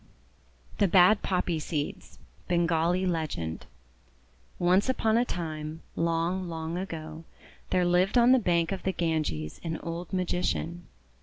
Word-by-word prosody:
THE 200 - +4
BAD 190 +3 +6
POPPY 180 -3 0
SEEDS 150 -1 -4 0.3
Bengali 175 +1 +2
Legend 155 - -3 0.9
ONCE 185 +7 +3
upon 225 -4 +2
a 235 - +4
time, 160 -5 -5
long, 170 +2 0
long 160 0 -4
ago, 165 -3 -6 0.5
there 180 -1 +2
lived 180 +5 +3
on 240 +1 +6
the 260 - +6
bank 170 -6 +1
of 190 -2 -3
the 190 - -1
Ganges 155 - -2
an 165 -1 -3
old 170 +1 -5
Magician. 175 -2 -2
175 Hz, 130 wpm, -28 LUFS, 160-185 Hz, 0.9 s, BAD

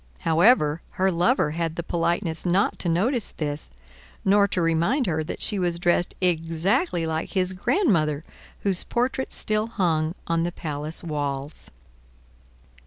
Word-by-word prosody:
However, 165 -2 +4 0.2
her 190 +1 +3
lover 175 - +2
had 165 0 -2
the 170 - -3
politeness 170 0 -1
not 185 +3 +1
to 175 - -1
notice 215 +8 +1
this, 145 - -4 0.6
nor 200 +1 +5
to 185 - -2
remind 170 - +2
her 160 -4 0
that 155 - -5
she 205 - +3
was 175 -2 0
dressed 175 +1 +1
exactly 175 - +1
like 160 0 -3
his 185 -1 +1
grandmother 170 - +1 0.4
whose 195 -3 0
portrait 255 +2 -1
still 215 +1 -1
hung 165 -6 0
on 165 0 0
the 175 +1 -1
palace 150 -1 -5
walls. 145 -2 -4
170 Hz, 140 wpm, -24 LUFS, 160-195 Hz, 0.6 s, nor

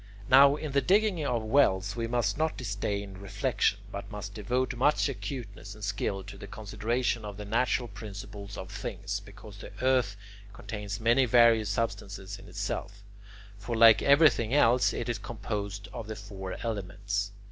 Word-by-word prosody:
Now 140 +2 +8
in 150 -1 -5
the 140 0 +3
digging 195 -2 +2
of 120 -3 0
wells 105 -5 +2
we 115 -1 -2
must 115 -4 0
not 160 +1 -1
disdain 100 -3 -3
reflection, 100 +2 0
but 100 0 -6
must 105 -1 -7
devote 125 +6 -1
much 140 +6 +3
acuteness 115 -7 -6
and 105 - -12
skill 100 -1 -2
to 100 0 -10
the 100 - -8
consideration 110 +3 -2
of 105 -1 -7
the 105 - -6
natural 120 +3 +1
principles 100 -1 -8
of 95 +1 -7
things, 100 -2 -4
because 100 +1 -13
the - - -9
earth 125 -6 +2 0.4
contains 100 0 -6
many 120 +4 +4
various 115 -3 +5
substances 100 -2 -3
in - - -14
itself; 100 +1 -4 0.6
for 115 +3 -4
like 115 -1 +8
everything 140 -4 +4
else, 125 -3 +4
it 120 - -4
is 120 -1 -2
composed 100 -3 -5
of 115 -3 -6
the 110 - -5
four 95 -2 -7
elements. 100 -2 -3
105 Hz, 160 wpm, -29 LUFS, 100-120 Hz, 0.6 s, Now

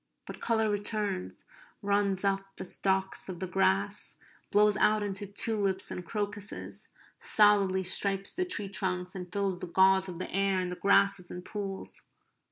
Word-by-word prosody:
But - - -9
colour 220 -1 +2
returns; 205 - -2 0.4
runs 200 -1 +1
up 195 0 -1
the - - -7
stalks 190 +1 -1
of 180 -2 -6
the 190 - -2
grass; 100 - 0 0.3
blows 210 0 +4
out 215 0 +3
into 200 0 -3
tulips 200 -1 0
and 180 - -5
crocuses; 205 +1 -4 0.3
solidly 200 -3 +4
stripes 195 +1 +1
the 370 - 0
tree 205 - -2
trunks; 180 -2 -2
and 180 -2 -7
fills 195 -2 -1
the 180 - -5
gauze 190 +2 +4
of 175 - -7
the 185 - -5
air 195 0 +2
and 180 -1 -2
the - - -3
grasses 200 -1 +3
and 180 0 -8
pools. 195 -2 -3
195 Hz, 160 wpm, -30 LUFS, 185-205 Hz, 0.4 s, blows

